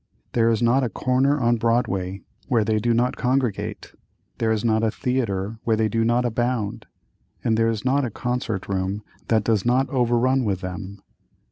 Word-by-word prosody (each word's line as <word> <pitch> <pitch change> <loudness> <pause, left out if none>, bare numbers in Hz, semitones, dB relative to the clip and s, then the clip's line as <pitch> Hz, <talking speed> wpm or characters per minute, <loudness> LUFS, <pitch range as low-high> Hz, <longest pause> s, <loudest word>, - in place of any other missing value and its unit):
There 115 -1 +3
is 115 0 +1
not 125 +3 +3
a 125 - 0
corner 130 +6 +1
on 120 -1 +2
Broadway 100 -5 0 0.2
where 115 -4 +2
they 110 0 +1
do 120 +2 +1
not 120 +2 +1
congregate; 125 -4 -1 0.5
there 110 -1 +1
is 110 0 0
not 110 -1 +2
a 115 - +2
theatre 110 -4 -2
where 115 - +2
they 110 0 +1
do 115 0 +1
not 120 +2 +2
abound, 120 -2 -1 0.6
and 115 - +2
there 115 0 +2
is 110 +1 -3
not 140 +2 +2
a 125 - -1
concert 120 -3 -3
room 95 +2 -2 0.2
that 110 -2 +2
does 110 -2 +1
not 125 +3 +2
overrun 125 0 +2
with 100 -4 -1
them. 95 +1 -7
115 Hz, 180 wpm, -23 LUFS, 105-125 Hz, 0.6 s, There